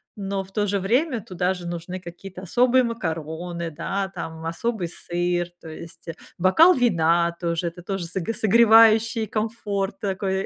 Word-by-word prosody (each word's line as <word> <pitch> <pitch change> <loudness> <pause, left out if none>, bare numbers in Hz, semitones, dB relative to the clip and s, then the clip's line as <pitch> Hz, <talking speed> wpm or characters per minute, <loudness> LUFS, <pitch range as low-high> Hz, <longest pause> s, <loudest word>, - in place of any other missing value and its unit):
но 195 -1 -3
в 190 - -17
то 205 0 0
же 200 0 0
время 245 - +1
туда 185 -3 -1
же 180 -2 -8
нужны 175 +2 -5
какие-то 185 +1 -10
особые 250 +6 +3
макароны, 170 -5 -4
да, 195 +5 -3
там, 160 0 -6
особый 185 +3 -2
сыр, 175 +1 -2
то - - -12
есть, 165 +1 -11
э, 165 - -4 0.2
бокал 250 - +6
вина 170 - +2
тоже, 170 0 -1
это 170 +1 -7
тоже 195 -1 -3
соге 180 +4 -3
согревающий 225 0 +5
комфорт 210 -2 -3
такой. 195 -1 -2
190 Hz, 155 wpm, -23 LUFS, 170-220 Hz, 0.2 s, бокал